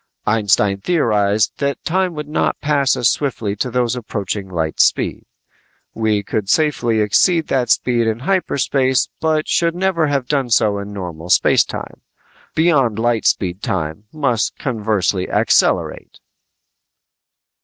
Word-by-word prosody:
Einstein 105 -2 +2
theorized 105 - +1
that 140 -1 -2
time 185 0 0
would 150 -1 -6
not 150 - -1
pass 145 -2 +1
as 120 - +2
swiftly 115 -8 -1
to 125 - -2
those 125 0 0
approaching 100 -4 -4
light 80 -3 -3
speed. - - +1 0.7
We 110 -2 0
could 100 -1 -3
safely 125 -7 +1
exceed 160 - +2
that 130 -2 0
speed 120 -2 +2
in 110 0 0
hyperspace 135 -6 0
but 155 -1 0
should 170 0 +1
never 180 -4 +1
have 140 -3 -1
done 135 -3 -1
so 105 -3 +2
in 100 +1 -7
normal 90 -4 -7
space - - +4
time. - - -8 0.5
Beyond 140 -10 +2
light 115 -1 +1
speed 90 0 0
time 80 +2 -3
must 125 -7 -1
conversely 105 - -1
accelerate! - - +1
115 Hz, 135 wpm, -18 LUFS, 105-145 Hz, 0.7 s, space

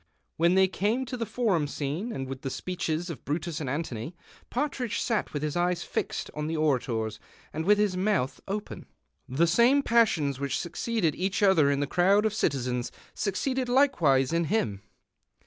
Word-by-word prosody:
When 170 +2 +3
they 190 0 +5
eame 215 +7 0
to 250 +1 -5
the 230 -2 -3
Forum 205 -9 +1
scene 150 - -3
and 135 -9 -4
the 135 +1 -5
speeches 175 +1 -3
of 145 - -9
Brutus 155 +2 -3
and 135 - -3
Antony, 140 0 -4 0.3
Partridge 250 -4 -2
sat 225 -3 -1
with 145 0 -3
his 150 -1 -2
eyes 175 0 0
fixed - - -3
on 150 0 -3
the 160 0 -2
orators 120 -7 0 0.3
and 160 +1 -3
with 205 +2 +5
his 205 -3 +1
mouth 185 -8 0
open. 205 +2 -5 0.4
The 140 +7 +3
same 240 +11 +4
passions 165 - +2
which 140 -1 -1
succeeded 175 -2 -1
each 190 +5 -1
other 175 -8 +5
in 140 0 +1
the - - +1
crowd 195 +8 +3
of 215 - +1
citizens 125 - -1 0.2
succeeded 255 +6 -1
likewise 170 - +3
in 170 0 +2
him. 115 - -1
170 Hz, 170 wpm, -28 LUFS, 140-210 Hz, 0.4 s, they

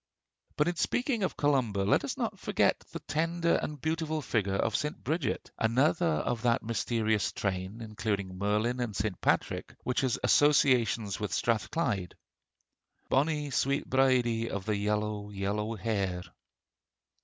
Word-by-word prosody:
But 150 - +3
in 175 -1 -1
speaking 245 +2 0
of 190 - -1
Columba 130 -9 +1
let 100 - +3
us - - -3
not - - -3
forget - - +2
the - - -6
tender 165 +2 +1
and 150 -1 -5
beautiful 160 0 -1
figure 100 -6 0
of - - 0
St. 150 0 -2
Bridget, 160 +2 -2
another 120 - +2
of 80 +9 0
that 120 -1 +2
mysterious 110 -2 0
train, 95 +3 -3
including 105 -3 -3
Merlin 105 +5 0
and 115 -4 -2
St. 100 -1 -2
Patrick, - - 0
which 125 - 0
has 130 -3 +1
associations 125 -8 +3
with 105 -4 -3
Strathclyde 110 - -1 0.9
"Bonnie 150 +1 +1
sweet 140 +2 +1
St. - - -20
Bride 125 -4 +3
of 100 -2 -4
the 105 -1 0
Yellow, 105 0 -1
yellow 105 +2 -2
hair!" 100 -4 -2
115 Hz, 145 wpm, -30 LUFS, 105-140 Hz, 0.9 s, But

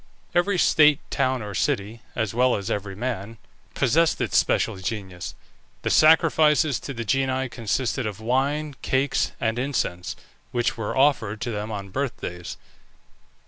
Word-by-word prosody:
Every 180 +2 +2
state, 150 -4 +5
town, 130 -3 0
or 105 -1 -6
city, 110 0 -1
(as 110 -3 -1
well 125 +1 +3
as 100 +3 -4
every 100 -1 -3
man), 115 -1 -4 0.4
possessed 160 +6 +2
its - - -1
special - - +2
genius. 95 -2 -5 0.5
The - - 0
sacrifices 155 -3 +5
to 140 - -6
the 115 0 -4
genii 130 +2 0
consisted 120 +1 -1
of 105 -1 -6
wine, 140 +6 0
cakes, 135 +1 +1
and 115 +1 0
incense, 120 -10 -2 0.4
which 120 -1 0
were 110 +2 -3
offered 120 -7 +2
to 120 -1 -2
them 105 0 -4
on 100 -2 -5
birthdays. 95 -7 -4
120 Hz, 140 wpm, -24 LUFS, 105-140 Hz, 0.5 s, state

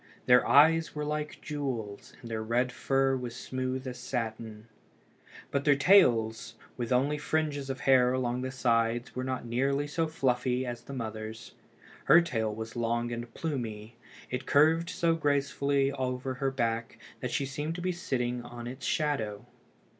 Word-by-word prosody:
Their 125 0 +5
eyes 155 +6 +5
were 150 0 -2
like 150 0 -4
jewels, 125 -9 -4
and 115 - -8
their 110 -1 -2
red 120 +3 0
fur 135 +1 +1
was 125 -2 -5
smooth 130 0 -3
as 125 -1 -6
satin. 110 -3 -4 0.9
But 140 0 0
their 145 -1 +5
tails, 120 - +4 0.2
with 120 -1 -4
only 140 +4 +2
fringes 150 -3 -1
of 130 -2 -4
hair 130 -2 +5
along 125 -1 -1
the 130 - -3
sides, 120 -2 0
were 130 - -2
not 130 -1 -3
nearly 135 +4 0
so 160 +2 -1
fluffy 130 -4 0
as 120 -1 -5
the 140 - -9
mother's. 110 -2 -6 0.5
Her 165 +5 +8
tail 115 -11 -1
was 110 +1 -7
long 120 0 -1
and 120 0 -5
plumy. 115 -8 -4 0.4
It 125 +1 -4
curved 160 +4 +4
so 165 -1 +1
gracefully 140 -2 +1
over 130 -1 -3
her 135 +2 -1
back 115 -3 -2 0.2
that - - -3
she 140 - -1
seemed 145 +4 -4
to 180 - -5
be 185 +1 0
sitting 125 -8 -2
in 120 0 -8
its 130 +2 -6
shadow. 115 -8 -1
130 Hz, 160 wpm, -29 LUFS, 120-140 Hz, 0.9 s, Her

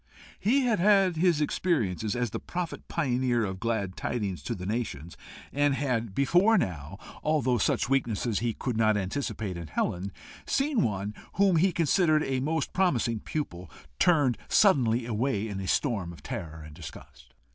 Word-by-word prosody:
He 255 +7 +3
had 235 -6 +1
had 195 -2 +4
his 170 -2 +3
experiences 110 - 0
as 120 -3 -1
the - - -3
prophet 175 -1 -5
pioneer 125 -6 0
of 95 -1 -5
glad 105 -5 -2
tidings 100 -7 -3
to - - -3
the 90 - -7
nations, 95 - -4 0.4
and 145 -1 +2
had 120 -7 -1
before 180 +11 +4
now, 85 - -3 0.2
although 135 -6 +1
such - - +1
weakness 120 -5 0 0.2
he 115 -2 -1
could 125 -3 -3
not 110 -2 +3
anticipate 100 -2 -3
in 85 -2 -7
Helen, 90 +5 -2 0.4
seen 275 -4 +1
one 100 - -1 0.2
whom 195 -3 +3
he 185 +4 +4
considered 160 -1 +3
a 130 -1 -1
most 155 +2 -1
promising 125 - +1
pupil, 90 - -5 0.3
turned 145 -8 +3
suddenly 125 - +4
away 115 -1 -1
in 100 -3 -5
a 95 - -5
storm 100 - 0
of 85 - -13
terror 80 -2 -6
and 75 - -11
disgust. 75 -2 -12
120 Hz, 160 wpm, -28 LUFS, 100-160 Hz, 0.4 s, had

